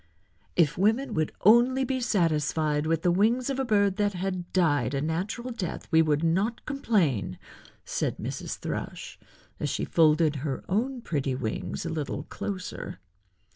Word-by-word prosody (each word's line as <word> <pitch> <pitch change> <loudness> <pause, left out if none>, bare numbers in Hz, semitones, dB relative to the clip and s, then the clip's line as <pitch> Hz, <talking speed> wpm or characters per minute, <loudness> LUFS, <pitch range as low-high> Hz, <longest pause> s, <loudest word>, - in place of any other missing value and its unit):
"If 165 -1 +2
women 225 +8 +2
would 155 -1 0
only 240 +5 +5
be 260 0 -1
satisfied 155 - +1
with 165 0 0
the 175 - +4
wings 230 +8 +2
of 270 - -2
a - - +2
bird 200 -4 +2
that 205 -1 +1
had 185 -1 -3
died 145 -6 +2
a - - +1
natural 185 - -2
death 195 -8 -5
we 160 - +6
would 155 -1 +1
not 195 +8 0
complain," 175 - 0 0.5
said - - -2
Mrs. - - -5
Thrush, - - -5 0.4
as - - -1
she - - -1
folded 155 -1 +3
her 135 -1 -3
own 245 +6 -1
pretty 140 - -1
wings 125 +5 -3
a - - -2
little 155 -3 -3
closer. 185 - -6
175 Hz, 155 wpm, -27 LUFS, 155-220 Hz, 0.5 s, we